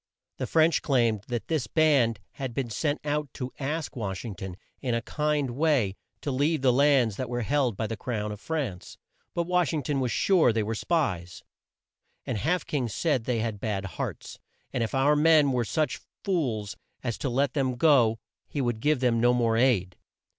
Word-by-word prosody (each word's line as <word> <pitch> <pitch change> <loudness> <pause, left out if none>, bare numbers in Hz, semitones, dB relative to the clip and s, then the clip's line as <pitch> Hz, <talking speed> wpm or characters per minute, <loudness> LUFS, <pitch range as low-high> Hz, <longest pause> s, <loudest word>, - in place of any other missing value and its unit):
The - - -3
French 160 0 +3
claimed 115 -7 +1
that 120 -4 -3
this 155 -8 -1
band 130 -6 +3
had 130 -4 -6
been 125 -4 -2
sent 145 +6 -1
out 150 -2 -1
to 130 -1 -5
ask 150 +2 -3
Wash 100 -3 -4
ing 110 - -4
ton, 95 -1 -7 0.2
in 125 -3 0
a 115 - 0
kind 150 -2 0
way, 130 -8 +1 0.3
to 145 - -2
leave 145 +2 +1
the 125 -2 +5
lands 130 -6 +3
that 130 -2 -3
were 120 -1 -2
held 130 -4 +1
by 110 - -1
the 115 +1 -3
crown 105 -1 -3
of 105 - -7
France. 125 - -4 0.4
But 170 - +1
Wash 180 -1 +1
ing 150 -3 -1
ton 140 +1 -1
was 125 -3 0
sure 180 -10 +4
they 110 -1 0
were 110 +2 -2
spies; 105 - -1 0.8
and 105 - -2
Half 160 - 0
King 130 -6 -1
said 130 +1 0
they 120 -3 0
had 110 -3 -3
bad 100 -2 -2
hearts, 95 - -6 0.3
and 125 - -1
if 115 - -3
our 140 +3 +4
men 150 -2 +5
were 125 -2 +1
such 155 +7 -1 0.2
fools 120 - -1 0.3
as 120 -3 -1
to 135 - -1
let 130 +2 +1
them 130 -3 0
go, 120 -5 +4 0.3
he 145 - -4
would 120 -4 0
give 150 +2 +1
them 120 -3 +2
no 120 +1 +4
more 115 -2 +2
aid. 115 -7 +2
125 Hz, 195 wpm, -27 LUFS, 115-150 Hz, 0.8 s, the